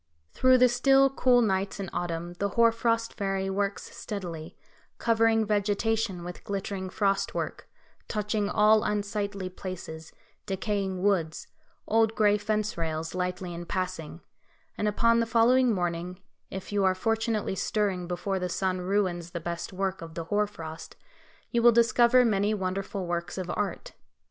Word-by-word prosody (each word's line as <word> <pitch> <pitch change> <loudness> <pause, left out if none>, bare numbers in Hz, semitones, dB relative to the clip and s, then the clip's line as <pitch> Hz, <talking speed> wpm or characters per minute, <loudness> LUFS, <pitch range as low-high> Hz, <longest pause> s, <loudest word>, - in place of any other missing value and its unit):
Through 255 0 +5
the 250 0 +6
still, 270 +2 +4
cool 250 -2 +4
nights 195 -1 -1
in 195 - -3
autumn 175 0 -3
the 200 - 0
Hoar 230 0 +6
frost 230 0 0
Fairy 195 -1 -2
works 200 +1 -3
steadily, 175 -5 -6 0.4
covering 225 -1 +3
vegetation 210 -1 0
with 175 0 -8
glittering 195 -1 -4
frost 195 0 0
work, - - -4 0.4
touching 210 -1 -1
all 215 0 +4
unsightly 205 -2 -2
places, 175 -4 -7 0.4
decaying 195 -1 -2
woods, 175 -6 +1 0.4
old 225 0 +2
gray 210 -1 +3
fence 210 -2 -1
rails 160 0 -3
lightly 180 0 -3
in 170 0 -7
passing, 180 -3 -4 0.5
and 210 - -1
upon 230 +3 +3
the 230 - +1
following 240 +2 +4
morning, 175 -1 -2 0.3
if 190 +1 -7
you 205 -1 +1
are 190 -1 +3
fortunately 225 0 0
stirring 190 -3 -1
before 190 +2 -2
the 180 0 -2
sun 185 0 -1
ruins 180 -3 0
the 170 - -5
best 170 +2 -5
work 190 0 -2
of 165 -1 -9
the 165 - -3
hoar 205 +5 +1
frost, 160 -5 -9 0.6
you 235 - +2
will 240 +1 +7
discover 235 +2 +5
many 210 -1 +2
wonderful 190 0 -3
works 175 +1 -3
of 180 -2 -3
art. 205 -2 -3
200 Hz, 150 wpm, -28 LUFS, 180-220 Hz, 0.6 s, will